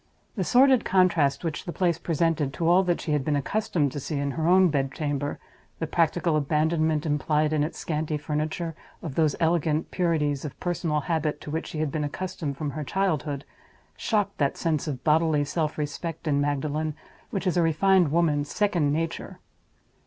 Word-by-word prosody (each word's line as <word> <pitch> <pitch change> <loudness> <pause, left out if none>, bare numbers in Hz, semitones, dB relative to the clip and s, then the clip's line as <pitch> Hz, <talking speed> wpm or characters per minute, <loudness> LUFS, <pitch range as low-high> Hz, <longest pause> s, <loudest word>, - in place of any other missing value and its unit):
The 195 - -1
sordid 260 +5 +5
contrast 180 -7 +2
which 160 -3 -3
the 175 - -4
place 170 -2 0
presented 165 -4 0
to 165 - -1
all 175 +2 +6
that 175 -1 +1
she 155 - -4
had 150 -2 +1
been 150 +1 0
accustomed 145 -1 0
to 145 - -4
see 145 +2 -4
in 140 0 -1
her 160 +3 -1
own 185 +1 +6
bed 135 -3 0
chamber—the 145 +2 -5
practical 165 0 +1
abandonment, 155 +1 +1
implied 150 +1 +1
in 150 -1 +2
its 155 - -4
scanty 155 -1 -2
furniture, 155 +2 -3 0.3
of 155 - -4
those 155 -1 +2
elegant 160 -1 +1
purities 150 -6 0
of 150 - -7
personal 170 -4 -1
habit 155 -1 -1
to 150 - -7
which 160 +2 -3
she - - -6
had 155 -3 -1
been 155 +1 -2
accustomed 150 -2 -4
from 150 -2 -3
her 150 +2 -4
childhood—shocked 190 - -3
that 140 -2 +1
sense 160 -2 -1
of 135 -4 -4
bodily 155 -1 +3
self 155 0 -2
respect 160 +2 -4
in 145 -1 +2
Magdalen 145 +2 -1 0.3
which 195 -1 -3
is 185 - +1
a 175 - +3
refined 170 0 +3
woman's 150 -3 +1
second 180 -9 +1
nature. 165 +2 -3
155 Hz, 175 wpm, -26 LUFS, 145-170 Hz, 0.3 s, all